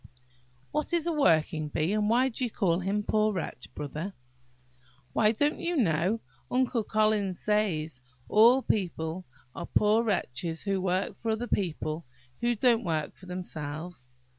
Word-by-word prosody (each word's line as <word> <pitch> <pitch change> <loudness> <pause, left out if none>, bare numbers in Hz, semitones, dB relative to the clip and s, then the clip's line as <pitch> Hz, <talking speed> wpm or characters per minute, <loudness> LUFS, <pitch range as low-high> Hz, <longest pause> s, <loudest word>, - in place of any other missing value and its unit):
"What 300 +3 -2
is 340 -2 +1
a 340 - +1
working 160 - +2
bee? 155 +6 0
and 210 0 +1
why 250 +3 +4
do 255 +1 -5
you 245 - 0
call 175 -5 +1
him 200 +3 -1
'Poor 215 +1 +2
wretch,' 165 -8 -5
Brother?" 155 +7 -5 1.0
"Why, 215 -1 +4
don't 290 +7 0
you 345 -1 -1
know, 190 - +2 0.3
Uncle 250 -2 +1
Collins 215 -3 +1
says, 165 -10 0 0.3
all 235 +5 +6
people 175 -3 -1 0.3
are 170 - -6
poor 215 +2 +3
wretches 165 - -1
who 195 -2 0
work 185 +1 0
for 225 - -4
other 220 +2 0
people 160 - -2 0.3
who 240 0 +1
don't 235 +1 +3
work 155 -5 -2
for 185 - -15
themselves? 160 -5 -6
200 Hz, 150 wpm, -29 LUFS, 165-225 Hz, 1.0 s, all